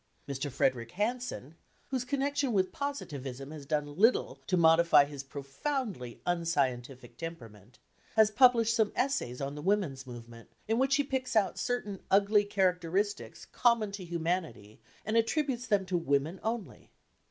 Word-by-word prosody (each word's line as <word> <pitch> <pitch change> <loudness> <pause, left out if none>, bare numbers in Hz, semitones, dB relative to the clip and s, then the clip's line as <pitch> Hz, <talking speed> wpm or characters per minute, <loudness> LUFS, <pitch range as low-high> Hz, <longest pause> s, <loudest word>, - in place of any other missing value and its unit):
Mr. 140 +1 -3
Frederic 125 -3 0
Harrison 215 - -3 0.4
(whose 260 -2 -1
connection 280 0 0
with 185 -2 +1
Positivism 140 - -5
has 150 -3 -9
done 150 0 0
little 215 - +3
to 185 - +2
modify 165 -2 +6
his 145 -1 -7
profoundly 140 - -5
unscientific 140 -7 -1
temperament) 115 - -9 0.4
has 220 -1 +5
published 230 -1 +5
some 220 -2 +2
essays 250 - -1
on 140 +1 -3
the 150 - -7
women's 160 -8 0
movement, 115 -1 -11 0.2
in 225 +2 +1
which 270 +1 +3
he 285 - +2
picks 260 -3 -3
out 200 -4 +2
certain 210 -6 -3
ugly 205 +2 +4
characteristics 190 +1 -1
common 235 -4 +2
to 200 -1 -6
humanity 165 - -3 0.2
and 215 +2 +1
attributes 250 +1 0
them 205 -3 +2
to 185 0 -2
women 150 +3 0
only. 225 -2 -4
185 Hz, 140 wpm, -30 LUFS, 140-230 Hz, 0.4 s, modify